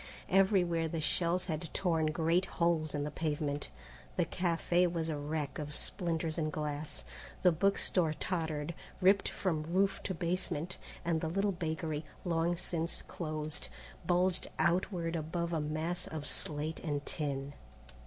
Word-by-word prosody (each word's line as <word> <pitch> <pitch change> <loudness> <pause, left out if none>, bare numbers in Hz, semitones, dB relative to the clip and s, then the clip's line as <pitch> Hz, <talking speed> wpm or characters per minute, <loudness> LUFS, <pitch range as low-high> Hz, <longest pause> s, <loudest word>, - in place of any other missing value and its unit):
Everywhere 180 -4 +4
the 160 +1 -2
shells 170 +4 +1
had 160 -1 -3
torn 165 -4 +2
great 165 +4 +2
holes 165 -3 +2
in 145 - 0
the 150 - -2
pavement. 145 -2 -1 0.5
The - - +3
café 175 0 +2
was 165 -1 -1
a 155 - 0
wreck 145 0 -2
of 150 0 -4
splinters 165 -3 0
and 155 -1 0
glass, 150 0 -3 0.4
the 180 - +7
book 195 +5 +3
store 165 -4 +2
tottered, 160 -3 -1 0.3
ripped 195 +1 +5
from 165 -5 0
roof 185 +5 +1
to 190 - -1
basement, 175 -1 -1 0.3
and 165 -2 +2
the 160 - 0
little 195 +4 +2
bakery, 160 -3 -2 0.2
long 170 0 +2
since 170 -1 -2
closed, 155 -2 -3 0.4
bulged 180 +1 +2
outward 170 -1 +1
above 170 +2 -1
a 160 - +1
mass 155 +4 -1
of 155 -2 -5
slate 155 +1 -1
and 145 -3 -2
tin. 140 -2 -2
165 Hz, 145 wpm, -33 LUFS, 155-175 Hz, 0.5 s, the